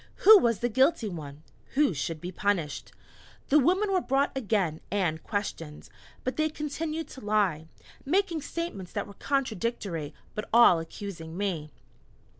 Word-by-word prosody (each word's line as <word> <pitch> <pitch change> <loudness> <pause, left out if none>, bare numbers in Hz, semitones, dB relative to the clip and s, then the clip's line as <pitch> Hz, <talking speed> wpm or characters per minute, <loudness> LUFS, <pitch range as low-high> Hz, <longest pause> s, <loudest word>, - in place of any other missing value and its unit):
Who 430 0 +11
was 230 - +1
the 240 - +2
guilty 260 0 +3
one? 155 -5 -8 0.3
Who 285 -7 +4
should 155 +2 -3
be 180 +3 -6
punished? 175 -7 -1 0.6
The 300 - +6
women 375 +8 +2
were 370 - +3
brought 275 0 +1
again 200 -10 0
and 175 -5 0
questioned. 165 -7 -5 0.3
But 255 - -3
they 310 0 +2
continued 310 +2 -4
to 260 - -10
lie, 200 -7 +1 0.4
making 345 +1 +1
statements 285 - -5
that 205 - -2
were 200 - -12
contradictory, 215 - -2 0.2
but 215 - -5
all 230 -7 +7
accusing 165 -1 -7
me. 180 -7 -2
210 Hz, 145 wpm, -28 LUFS, 170-280 Hz, 0.6 s, Who